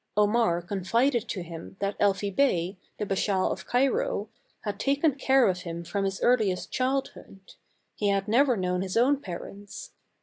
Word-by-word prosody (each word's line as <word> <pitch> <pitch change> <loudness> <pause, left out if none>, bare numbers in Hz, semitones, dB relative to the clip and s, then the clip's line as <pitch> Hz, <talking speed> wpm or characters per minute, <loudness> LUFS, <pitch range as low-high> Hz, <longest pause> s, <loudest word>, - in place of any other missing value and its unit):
Omar 210 -4 +3
confided 230 +7 0
to 185 - -3
him 170 +1 -9
that 200 0 -1
Elfi 200 -1 +1
Bey, 185 -10 +2 0.2
the 210 - -2
Bashaw 195 -1 +1
of - - -6
Cairo, 440 - +1 0.3
had - - -4
taken 285 +2 +2
care 265 -1 +3
of 180 -2 0
him 170 -2 -6
from 195 +4 -2
his 195 0 -2
earliest 215 -7 +2
childhood; 255 -7 -3 0.4
he 210 - -1
had 195 0 0
never 250 +2 +3
known 180 -1 -1
his 190 +2 -2
own 265 +5 +4
parents. 200 - -8
205 Hz, 160 wpm, -27 LUFS, 185-255 Hz, 0.4 s, own